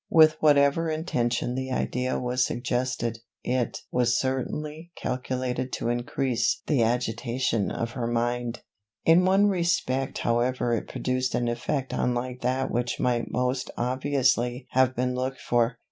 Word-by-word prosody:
With 155 -1 +6
whatever 145 +2 +4
intention 125 -7 -1
the 130 +1 -3
idea 125 0 -1
was 125 +1 +1
suggested, 120 -2 -1 0.2
it 125 -1 -1
was 125 -1 +2
certainly 150 +5 -3
calculated 130 0 -2
to 115 - -1
increase 120 +1 0
the 145 -6 +2
agitation 115 -1 0
of 115 0 -3
her 120 -1 -3
mind. 120 0 -1 0.4
In 170 +3 +6
one 195 +2 +4
respect 170 -9 0
however 120 +1 +1
it 115 - -2
produced 130 0 -1
an 120 - 0
effect 130 +3 -2
unlike 125 +1 -1
that 130 +2 0
which 120 0 -1
might 120 -2 0
most 125 0 -1
obviously 125 -1 +1
have 130 0 +3
been 125 +1 0
looked 130 +1 -3
for. 120 0 +1
125 Hz, 135 wpm, -26 LUFS, 120-130 Hz, 0.4 s, With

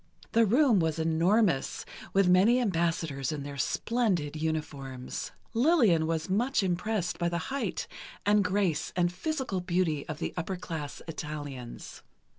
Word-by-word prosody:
The 230 -1 +4
room 245 -1 +4
was 160 -2 0
enormous, 165 +1 +2 0.3
with 195 -1 +3
many 195 +7 +5
ambassadors 165 - 0
in 150 -2 -4
their 140 -1 -7
splendid 190 - 0
uniforms. 145 -5 -4 0.2
Lillian 230 - +4
was 160 -1 -1
much 230 +5 +1
impressed 185 0 -1
by 170 - +1
the 170 - -1 0.2
height 280 - -2 0.4
and 205 0 +4
grace 185 -5 0
and 175 -1 +2
physical 260 - -2
beauty 175 -5 0
of 155 - -3
the 165 - -3
upper 180 +2 -2
class 160 -5 -6
Italians. 145 -6 -7
175 Hz, 135 wpm, -29 LUFS, 155-205 Hz, 0.4 s, many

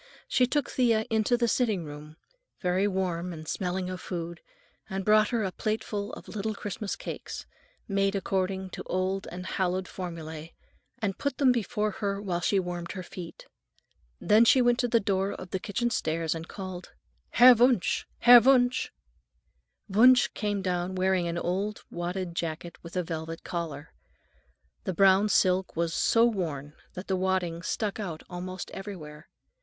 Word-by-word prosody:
She 250 - +3
took 290 +1 0
Thea 230 -4 +2
into 220 +2 +2
the 235 -1 +1
sitting 220 -7 +1
room, 150 +1 -10 0.4
very 185 +2 +1
warm 180 -2 -2
and 155 -2 -8
smelling 180 +1 -2
of 185 0 -5
food, 170 -1 -5 0.5
and 190 -1 -3
brought 215 0 +5
her 230 -3 0
a 190 - -1
plateful 215 0 -3
of - - -9
little 215 0 -3
Christmas 205 0 -4
cakes, - - -7 0.4
made 195 -1 +1
according 190 -1 -1
to - - -6
old 185 +1 -1
and 180 +1 -7
hallowed 185 0 -1
formulae, 165 -3 -7 0.4
and 200 -3 -3
put 280 -2 -2
them 270 -3 +5
before 215 -2 0
her 200 0 -2
while 180 -4 -2
she 200 - +2
warmed 175 -2 -4
her 185 -2 -6
feet. 170 -1 -9 0.7
Then 215 +2 +5
she 260 +3 +6
went 245 0 +3
to 245 - +2
the 230 0 +3
door 195 -1 0
of 185 -1 -9
the 190 - -1
kitchen 235 +5 -1
stairs 160 -4 0
and 165 0 -6
called: 185 -2 -8 0.4
"Herr 250 +1 +9
Wunsch, 240 -4 +2 0.2
Herr 245 0 +10
Wunsch!" 250 0 +3 1.0
Wunsch 245 +5 +6
came 205 -2 -2
down 180 0 -1
wearing 185 -1 +1
an 170 0 -2
old 195 +5 -2
wadded 175 +1 -3
jacket, 170 0 -4
with 170 +1 -11
a 180 - +1
velvet 165 0 -5
collar. 165 -4 -5 0.9
The 185 -4 -3
brown 195 +3 +5
silk 185 -1 +2
was 165 0 0
so 230 +6 +4
worn 155 -10 -2 0.2
that 185 - -6
the 190 - 0
wadding 185 -3 0
stuck 210 +5 -2
out 175 -7 -5
almost 185 +1 -6
everywhere. 160 -6 -8
190 Hz, 160 wpm, -28 LUFS, 175-215 Hz, 1.0 s, Herr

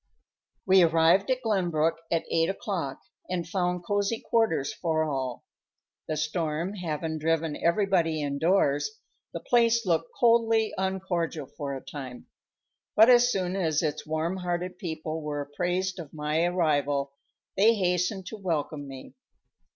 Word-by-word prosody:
We 190 0 +6
arrived 165 +4 +4
at 255 0 0
Glenbrook 170 -7 +1
at 165 -1 0
eight 165 +1 +2
o'clock 180 -8 -3 0.3
and 175 -2 -2
found 180 -1 -1
cozy 205 +3 0
quarters 220 -12 +1
for 160 -2 0
all. 135 -5 -3 0.6
The 155 - -2
storm 155 +3 -2
having 160 -4 -3
driven 160 -1 0
everybody 170 -3 +1
indoors, 145 - +1 0.3
the - - -5
place 235 -1 +3
looked 165 -2 +1
coldly 230 -2 +3
uncordial 185 -5 -2
for 140 +1 -6
a 135 - -9
time; 130 -4 -8 0.7
but 220 +4 +8
as 245 0 +6
soon 185 -3 -1
as 160 -4 +1
its 150 -2 -2
warm 160 +4 -1
hearted 180 0 -3
people 160 -2 -4
were 150 -1 -3
apprised 180 +6 -2
of 155 -3 -9
my 150 +2 0
arrival 145 -5 +1 0.4
they 220 +4 +5
hastened 180 0 0
to 220 - -7
welcome 155 -6 -3
me. 135 -1 -10
170 Hz, 135 wpm, -27 LUFS, 155-190 Hz, 0.7 s, but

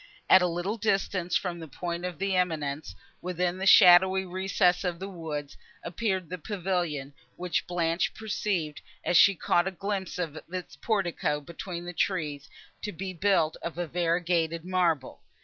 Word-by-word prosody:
At 190 - +9
a 180 - +3
little 175 +6 -2
distance 195 -4 0
from 175 -2 -1
the 160 - -8
point 170 +4 -4
of 180 -3 -4
the 195 -1 0
eminence, 155 -5 -1 0.3
within 180 0 -1
the 190 - -1
shadowy 190 +1 +7
recess 180 0 +1
of 180 -2 -2
the 190 +3 -6
woods, 155 -6 -6 0.3
appeared 185 0 -2
the 180 +2 -6
pavilion, 175 -7 -2 0.2
which 175 -2 -2
Blanche 170 -1 0
perceived, 195 -8 -2 0.2
as 175 - +1
she 200 +3 +7
caught 175 +1 +2
a - - -1
glimpse 195 0 -4
of 160 -3 -3
its 185 -1 -6
portico 175 -8 -1
between 170 +3 -7
the 175 - -6
trees, 150 -7 -2 0.3
to 210 - -4
be 185 +2 -5
built 170 -3 +2
of 170 - -5
variegated 170 -1 0
marble. 175 -7 0
175 Hz, 155 wpm, -28 LUFS, 165-190 Hz, 0.3 s, At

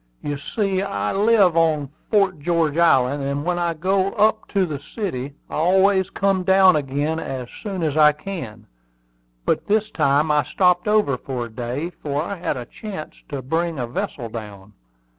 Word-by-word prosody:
"You 145 - -2
see, 190 +6 -1
I 105 - -2
live 200 -4 +4
on 155 -4 +2 0.2
Fort 195 -6 +2
George 165 -1 +1
Island, 145 -5 +3
and 140 +2 -2
when 175 0 0
I 170 -1 0
go 190 +4 0
up 220 +1 +2
to 195 -2 +1
the 150 -5 -5
city 140 - -5
I - - -13
always 190 +3 +3
come 195 -1 +1
down 190 -1 +5
again 145 +2 -1
as 130 -5 -5
soon 195 -5 -4
as 150 -2 0
I 150 -1 +7
can; 145 - -7 0.8
but - - 0
this 215 +1 +1
time 145 +3 +2
I 150 0 +4
stopped 180 -1 +2
over 210 -11 +2
for 125 -3 -4
a - - -10
day, 125 +9 -4
for 145 -3 -4
I 200 +3 -5
had 170 -5 -2
a 125 - -6
chance 190 - -8
to 140 -3 -5
bring 165 +4 -1
a 125 - -2
vessel 120 0 -4
down. 105 -3 -9
160 Hz, 180 wpm, -22 LUFS, 140-190 Hz, 0.8 s, I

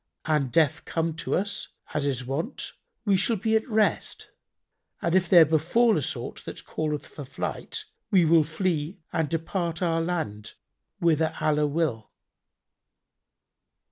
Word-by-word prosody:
An 150 -4 +2
death 150 +3 +2
come 165 0 -1
to - - -1
us, 200 +2 -1 0.3
as 145 -1 0
is 125 -3 -1
wont, 145 - -3 0.3
we 200 -2 +4
shall 195 +5 +2
be 220 +2 +1
at 220 +3 0
rest, 215 -1 0 0.7
and 170 - -1
if 185 -2 +3
there 170 -3 +9
befal 170 +10 +3
us 150 - 0
aught - - -7
that - - -8
calleth 150 -1 -2
for 145 - -9
flight, 135 - -5 0.2
we 185 -4 +5
will 160 0 +5
flee 160 +1 -2 0.2
and 160 -3 0
depart 165 +1 -2
our 165 -1 +1
land 160 -12 -3 0.5
whither 160 -1 +2
Allah 150 -1 +2
will." 145 -8 -1
165 Hz, 140 wpm, -26 LUFS, 150-180 Hz, 0.7 s, there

